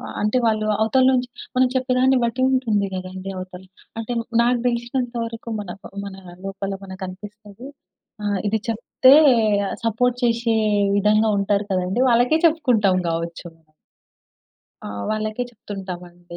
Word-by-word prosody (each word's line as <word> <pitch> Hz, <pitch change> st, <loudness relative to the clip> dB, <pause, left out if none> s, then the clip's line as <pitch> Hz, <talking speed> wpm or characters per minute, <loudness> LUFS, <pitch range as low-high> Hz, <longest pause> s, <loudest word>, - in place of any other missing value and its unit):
ఆహ్, -, -, -7 dB
అంటే 210 Hz, +4 st, +1 dB
వాళ్ళు 215 Hz, -1 st, +1 dB, 0.2 s
అవతల 255 Hz, +4 st, +3 dB
నుంచి 250 Hz, -1 st, +1 dB, 0.3 s
మనం 255 Hz, 0 st, +5 dB
చెప్పేదాన్ని 260 Hz, 0 st, +2 dB
బట్టి 235 Hz, +2 st, -2 dB
ఉంటుంది 225 Hz, -6 st, +1 dB
గదండీ 185 Hz, +1 st, -6 dB
అవతల. 185 Hz, 0 st, -8 dB, 0.3 s
అంటే 225 Hz, +2 st, -4 dB, 0.3 s
నాకు 245 Hz, +1 st, +2 dB
దెలిసినంత 240 Hz, +1 st, -2 dB
వరకు 230 Hz, 0 st, -8 dB
మన 190 Hz, -3 st, -7 dB
ప -, -, -38 dB, 0.2 s
మన 195 Hz, -1 st, -8 dB, 0.3 s
లోపల 195 Hz, 0 st, -4 dB
మనకనిపిస్తది 200 Hz, +4 st, -9 dB, 0.6 s
ఆహ్, 205 Hz, -2 st, 0 dB
ఇది 220 Hz, +2 st, +1 dB
చెప్తే 240 Hz, +4 st, +4 dB, 0.7 s
సపోర్ట్ 240 Hz, +2 st, +1 dB
చేశే 230 Hz, -1 st, +1 dB, 0.4 s
విధంగా 215 Hz, +2 st, +3 dB
ఉంటారు 200 Hz, +1 st, 0 dB
కదండీ 185 Hz, +6 st, 0 dB
వాళ్ళకే 245 Hz, +7 st, +3 dB
చెప్పుకుంటాం 245 Hz, -, +2 dB
గావచ్చు 165 Hz, +1 st, -4 dB
మనం. 160 Hz, -1 st, -32 dB, 1.2 s
ఆహ్, 100 Hz, 0 st, -5 dB
వాళ్ళకే 215 Hz, +2 st, -2 dB
చెప్తుంటాం 195 Hz, -5 st, -7 dB
అండి. 175 Hz, 0 st, -13 dB
215 Hz, 130 wpm, -22 LUFS, 195-245 Hz, 1.2 s, మనం